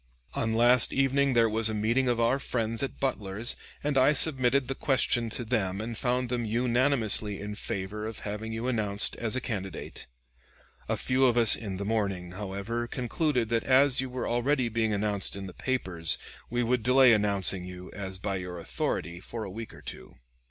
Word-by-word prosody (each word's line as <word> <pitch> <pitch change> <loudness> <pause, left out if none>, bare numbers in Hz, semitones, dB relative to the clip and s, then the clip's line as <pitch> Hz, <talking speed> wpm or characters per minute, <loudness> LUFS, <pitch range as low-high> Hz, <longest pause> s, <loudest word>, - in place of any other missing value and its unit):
On 110 - -1
last 120 +1 +5
evening 135 0 +2
there 115 -1 +4
was 110 0 0
a 110 - -3
meeting 115 +5 +1
of 120 -1 0
our 120 +4 +2
friends 115 -4 -2
at 135 - -4
Butler's, 110 -4 0 0.3
and 145 -2 +1
I 135 +3 +4
submitted 135 -3 +4
the 135 - -2
question 125 -4 0
to 120 +2 -4
them 100 -5 -1
and 115 +2 -5
found 125 +1 -1
them 120 -1 -2
unanimously 120 -2 +1
in 105 +1 -6
favor 105 +1 -5
of 110 - -8
having 105 +2 -5
you 115 +2 -4
announced 105 -4 +4
as 115 0 -1
a - - 0
candidate. 95 -7 -6 0.8
A - - 0
few 130 +1 +1
of 120 -1 +1
us 115 -3 +6
this 100 -4 -2
morning, 100 -5 -2
however, 105 +5 -4
concluded 125 -1 -1
that 115 -1 0
as 135 0 +4
you 130 - -5
were 125 -1 -4
already 125 +1 0
being 110 -1 -1
announced 100 -1 0
in 100 -1 -7
the 95 - -9
papers 95 -11 +2 0.3
we 120 +1 0
would 125 +1 0
delay 125 +1 +5
announcing 100 -3 +1
you, 90 0 -10
as 95 -2 -6
by 95 0 -3
your 90 -1 -7
authority, 85 0 -3
for 115 +4 -7
a 100 - -7
week 115 +2 -8
or - - -15
two. - - -9
115 Hz, 185 wpm, -28 LUFS, 100-125 Hz, 0.8 s, us